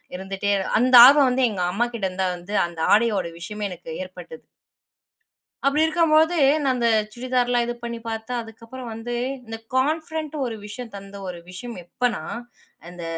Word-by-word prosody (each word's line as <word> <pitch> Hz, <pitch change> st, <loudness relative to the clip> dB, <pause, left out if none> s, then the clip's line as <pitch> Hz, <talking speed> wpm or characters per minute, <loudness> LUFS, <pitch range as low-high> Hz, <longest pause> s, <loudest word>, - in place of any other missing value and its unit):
இருந்துட்டே 195 Hz, +2 st, -3 dB, 0.3 s
அந்த 255 Hz, +2 st, +4 dB
ஆர்வம் 275 Hz, 0 st, +7 dB
வந்து 255 Hz, +1 st, +1 dB
எங்க 200 Hz, -4 st, -4 dB
அம்மாகிட்ட 235 Hz, +1 st, -1 dB
இருந்துதான் 185 Hz, 0 st, -1 dB
வந்து, 175 Hz, +4 st, -9 dB
அந்த 170 Hz, -1 st, -11 dB
ஆடையோட 210 Hz, -5 st, +2 dB
விஷயமே 210 Hz, +4 st, -4 dB
எனக்கு 175 Hz, -2 st, -10 dB
ஏற்பட்டது. 185 Hz, -, -11 dB, 1.2 s
அப்டி 290 Hz, +2 st, +2 dB
இருக்கும்பொழுது, 320 Hz, +1 st, +3 dB, 0.2 s
நா 275 Hz, -, +1 dB
அந்த 240 Hz, -1 st, +1 dB, 0.3 s
சுடிதார்லாம் 245 Hz, 0 st, 0 dB
இது 240 Hz, -, -3 dB
பண்ணி 235 Hz, 0 st, -4 dB
பார்த்தா 225 Hz, +2 st, -4 dB
அதுக்கப்பறம் 230 Hz, +3 st, -10 dB
வந்து, 225 Hz, +2 st, -6 dB, 0.3 s
இந்த 225 Hz, 0 st, -6 dB, 0.2 s
கான்ஃபிடென்ட்டு 310 Hz, +2 st, -1 dB
ஒரு 235 Hz, -2 st, -4 dB
விஷயம் 230 Hz, +2 st, -8 dB
தந்த 200 Hz, 0 st, -10 dB
ஒரு 180 Hz, -1 st, -5 dB
விஷயம் 230 Hz, +6 st, -7 dB
எப்பன்னா, 235 Hz, +4 st, -2 dB, 0.7 s
இந்த 175 Hz, -1 st, -9 dB
235 Hz, 145 wpm, -23 LUFS, 200-255 Hz, 1.2 s, ஆர்வம்